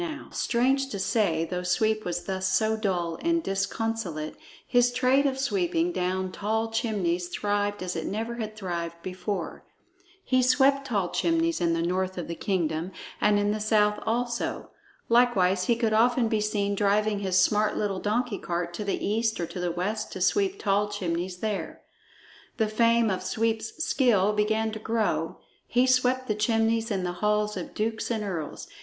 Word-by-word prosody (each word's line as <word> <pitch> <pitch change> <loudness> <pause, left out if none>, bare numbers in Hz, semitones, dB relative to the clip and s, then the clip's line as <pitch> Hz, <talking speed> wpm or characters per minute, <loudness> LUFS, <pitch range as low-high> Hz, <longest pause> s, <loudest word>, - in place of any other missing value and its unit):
Now, 315 -3 -5
strange 265 +3 +1
to 205 - -4
say, 190 -4 +1
though 180 +1 -3
Sweep 215 +4 +1
was 175 0 -2
thus 190 -1 -1
so 220 +3 +2
dull 180 -6 -1
and 335 0 +1
disconsolate, 195 - -2 0.3
his 245 -1 +4
trade 260 +3 +3
of 265 -1 -1
sweeping 340 +4 0
down 185 - -1
tall 220 +3 -1
chimneys 190 -6 -1
thrived 205 +1 -1
as 180 0 -3
it 165 - -3
never 225 +3 -3
had 215 -2 -5
thrived 170 -4 -4
before. 190 +2 -4 0.6
He 255 -1 +2
swept 275 +2 +3
tall 200 -7 0
chimneys 330 0 +1
in 170 -1 +2
the 165 0 0
north 185 +2 -1
of 175 - -4
the 170 - -3
kingdom, 170 -2 -1 0.3
and 210 -1 +4
in 205 0 +1
the 215 - -2
south 210 -1 +2
also. 235 +1 -2 0.4
Likewise 195 -6 +3
he 235 - +3
could 225 -2 0
often 240 +2 +3
be 220 -2 0
seen 205 -1 0
driving 205 +1 +1
his 190 -2 0
smart 210 +3 +3
little 200 -3 -1
donkey 220 +1 -1
cart 175 -1 -3
to 190 - -4
the 200 - -2
east 220 +2 0
or 170 - 0
to 180 - -7
the 180 -1 -1
west 205 +5 -3
to - - -6
sweep 390 - +2
tall 205 0 +1
chimneys 180 -2 -3
there. 215 -2 -3 0.7
The 220 - +2
fame 230 0 +3
of 185 -1 -2
Sweep's 220 +8 -1
skill 210 -6 +3
began 220 +1 +1
to 220 - -6
grow; 225 0 -1 0.3
he 245 +1 +3
swept 255 0 +2
the 215 - +1
chimneys 225 +1 +1
in 195 -4 -1
the 180 - -1
halls 210 0 +1
of 180 -3 -6
dukes 220 +1 -2
and 225 -3 -1
earls. 170 -7 -5
210 Hz, 175 wpm, -27 LUFS, 185-230 Hz, 0.7 s, his